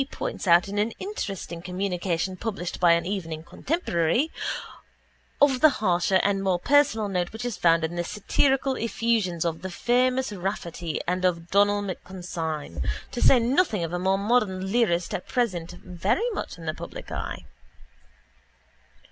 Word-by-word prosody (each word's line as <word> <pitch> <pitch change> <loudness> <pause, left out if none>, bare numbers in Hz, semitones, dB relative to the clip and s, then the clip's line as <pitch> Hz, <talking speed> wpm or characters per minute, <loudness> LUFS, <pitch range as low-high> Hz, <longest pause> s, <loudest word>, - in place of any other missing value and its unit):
points - - -5
out 175 +2 +6
in 205 +1 -2
an 210 +2 +2
interesting 195 - -5
communication 180 -1 -2
published 190 -3 -4
by 175 -2 +6
an 170 0 +1
evening 165 -5 -4
contemporary) 250 - 0 1.1
of 275 -3 +4
the 310 - +8
harsher 185 -1 +2
and 200 -1 +1
more 190 -2 +2
personal 240 -1 +3
note 180 -3 -1
which 225 +2 -6
is 240 -4 -2
found 165 -2 +3
in 160 +2 -2
the 175 - -1
satirical 265 +8 +1
effusions 220 -7 0
of 165 -1 -2
the 190 - -5
famous 250 +6 +1
Raftery 175 -4 -3
and 180 +1 0
of 170 -2 0
Donal 205 +1 +3
MacConsidine 165 - -5 0.3
to 240 - -4
say 265 - +7
nothing 235 - +2
of 165 +1 -4
a 180 - -1
more 190 +1 +2
modern 200 -3 +1
lyrist 180 -7 +1
at - - -4
present 180 -9 -1
very 185 - -1
much 400 - -5
in 165 - -10
the 155 - -1
public - - -9
eye. - - -5
190 Hz, 155 wpm, -26 LUFS, 175-230 Hz, 1.1 s, the